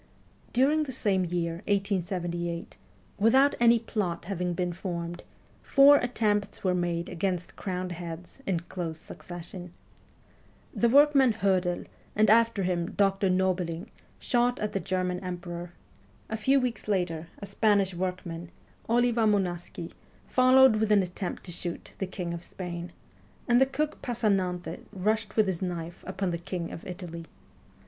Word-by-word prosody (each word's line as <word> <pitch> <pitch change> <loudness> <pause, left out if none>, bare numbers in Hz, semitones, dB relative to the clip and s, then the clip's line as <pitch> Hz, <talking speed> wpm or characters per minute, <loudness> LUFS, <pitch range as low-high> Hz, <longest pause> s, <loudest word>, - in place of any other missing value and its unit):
During 295 +5 +3
the 270 - -5
same 200 -7 +1
year, 170 -1 -2
1878, 175 -4 -1 0.4
without 265 +7 +5
any 235 0 +6
plot 205 -7 -3
having 180 -2 -2
been 180 0 -1
formed, 175 -2 -5 0.4
four 280 +1 +7
attempts 210 -5 0
were 185 -2 +2
made 175 -1 -1
against 180 0 -2
crowned 185 -1 -3
heads 170 +4 -7
in 180 -4 +1
close 170 -2 -5
succession. 175 +1 -9 1.0
The 235 - +2
workman 275 -2 +6
Hoedel, 185 -4 +1 0.3
and 215 0 +5
after 230 -3 +4
him 175 -2 -1
Dr. 195 -1 +2
Nobiling, 185 -2 0 0.3
shot 245 0 +1
at 210 - -2
the 195 - 0
German 180 0 -1
Emperor; 175 -1 -6 0.6
a - - 0
few 265 +5 +3
weeks 245 -5 -3
later, 175 -5 -1
a 200 - -7
Spanish 200 -1 +2
workman, 175 -2 -4 0.4
Oliva 235 -1 +3
Moncasi, 175 -4 -1 0.4
followed 255 -2 +6
with 215 0 +1
an 205 -2 +5
attempt 180 +1 -5
to 180 - -8
shoot 170 0 -5
the 195 - -1
King 180 -2 -4
of 170 - -5
Spain, 175 -1 -6 0.6
and 245 +1 +5
the 265 - +6
cook 300 +3 -2
Passanante 195 -8 -1
rushed 215 +2 -1
with 215 - +4
his 185 -4 -2
knife 175 -2 -4
upon 190 -1 -2
the 170 - -3
King 175 -1 -4
of - - -8
Italy. 175 -2 -7
185 Hz, 140 wpm, -28 LUFS, 175-220 Hz, 1.0 s, four